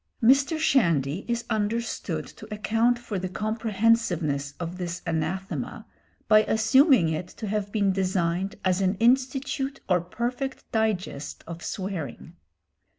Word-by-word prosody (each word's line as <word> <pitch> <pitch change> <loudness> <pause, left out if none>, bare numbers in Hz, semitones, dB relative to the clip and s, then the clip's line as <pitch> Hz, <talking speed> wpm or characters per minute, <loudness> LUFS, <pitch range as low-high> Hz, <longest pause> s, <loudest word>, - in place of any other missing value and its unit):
Mr. 275 +6 +5
Shandy 170 - +2
is 235 0 -1
understood 210 -7 -2
to 215 +1 -13
account 225 +3 +2
for 235 -5 -4
the 185 0 -3
comprehensiveness 200 -9 0
of 175 +1 -5
this 175 0 -4
anathema 170 +4 -3 0.4
by 215 -1 +7
assuming 225 - +5
it 160 +2 -3
to 215 - -8
have 205 -1 -2
been 200 -2 +2
designed 185 +1 0
as 185 +1 +2
an 190 +1 +2
institute 265 +4 +1
or 180 -2 +3
perfect 245 +9 -3
digest 190 - -2
of 170 0 -8
swearing. 170 - -5
200 Hz, 125 wpm, -26 LUFS, 175-230 Hz, 0.4 s, by